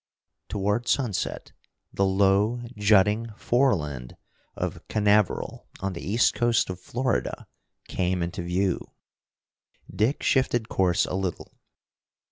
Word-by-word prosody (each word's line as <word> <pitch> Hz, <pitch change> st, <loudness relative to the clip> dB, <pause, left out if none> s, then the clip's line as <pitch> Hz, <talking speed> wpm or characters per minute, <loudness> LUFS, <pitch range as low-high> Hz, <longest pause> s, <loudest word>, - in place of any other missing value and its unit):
Toward 105 Hz, +3 st, -1 dB
sunset 110 Hz, -10 st, -1 dB, 0.4 s
the 100 Hz, -, +2 dB
low 100 Hz, +5 st, +2 dB
jutting 105 Hz, +2 st, +3 dB
fore 125 Hz, 0 st, +3 dB
land 70 Hz, -7 st, -6 dB, 0.4 s
of -, -, -4 dB
Canaveral 105 Hz, -2 st, +1 dB
on 95 Hz, 0 st, -2 dB
the 85 Hz, -, -7 dB
east 110 Hz, +6 st, +2 dB
coast 120 Hz, -5 st, +1 dB
of 90 Hz, -, -7 dB
Florida, 125 Hz, +6 st, -2 dB, 0.4 s
came 90 Hz, -1 st, -1 dB
into 85 Hz, +2 st, -4 dB
view. 90 Hz, +2 st, 0 dB, 1.1 s
Dick 115 Hz, +7 st, +1 dB
shifted 120 Hz, -4 st, +1 dB
course 90 Hz, -3 st, +2 dB
a -, -, -5 dB
little. 95 Hz, -2 st, -4 dB
100 Hz, 110 wpm, -26 LUFS, 95-115 Hz, 1.1 s, jutting